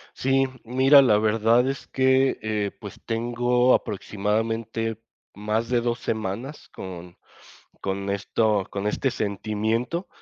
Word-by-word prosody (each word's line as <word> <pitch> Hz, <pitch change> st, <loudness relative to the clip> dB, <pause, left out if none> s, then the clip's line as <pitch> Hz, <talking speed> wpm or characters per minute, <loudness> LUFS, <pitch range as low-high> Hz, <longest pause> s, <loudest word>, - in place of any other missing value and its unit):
Sí, 135 Hz, +1 st, +2 dB, 0.2 s
mira, 135 Hz, +4 st, +6 dB
la 110 Hz, -6 st, +4 dB
verdad 115 Hz, +3 st, +3 dB
es 135 Hz, -, -5 dB
que, 130 Hz, 0 st, +2 dB
eh, 105 Hz, -2 st, -2 dB
pues, -, -, -9 dB
tengo 120 Hz, +2 st, +2 dB
aproximadamente 110 Hz, +2 st, -2 dB, 0.3 s
más 105 Hz, +2 st, -2 dB
de 120 Hz, -1 st, +2 dB
2 120 Hz, 0 st, -1 dB
semanas 110 Hz, +7 st, -4 dB
con 90 Hz, -2 st, -9 dB, 0.6 s
con 100 Hz, 0 st, -3 dB
esto 100 Hz, 0 st, 0 dB
con 100 Hz, +1 st, -3 dB
este 135 Hz, +5 st, 0 dB
sentimiento. 110 Hz, -, -2 dB
115 Hz, 115 wpm, -24 LUFS, 105-125 Hz, 0.6 s, mira